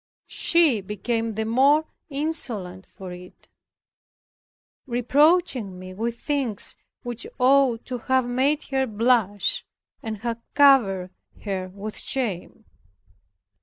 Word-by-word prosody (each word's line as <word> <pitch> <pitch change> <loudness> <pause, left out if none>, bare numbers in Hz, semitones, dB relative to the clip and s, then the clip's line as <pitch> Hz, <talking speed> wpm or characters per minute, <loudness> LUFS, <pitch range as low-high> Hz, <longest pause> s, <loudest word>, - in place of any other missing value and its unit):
She 320 -11 +3
became 225 +3 -2
the 220 +1 -2
more 275 +7 +4 0.2
insolent 240 - -3
for 190 -2 -10
it; 180 0 -13 1.4
reproaching 255 - +2
me 185 0 -9
with 230 +4 -3
things 270 -8 -1 0.3
which 240 -1 -4
ought 255 -2 +3
to 250 -1 -4
have 260 +1 +1
made 275 +5 +1
her 265 -1 +1
blush 215 -3 +1 0.4
and 220 -1 -5
have 235 -1 -3
covered 210 -11 +4 0.3
her 190 -3 -3
with 200 +3 -7
shame. 225 -4 -3
235 Hz, 105 wpm, -24 LUFS, 200-270 Hz, 1.4 s, more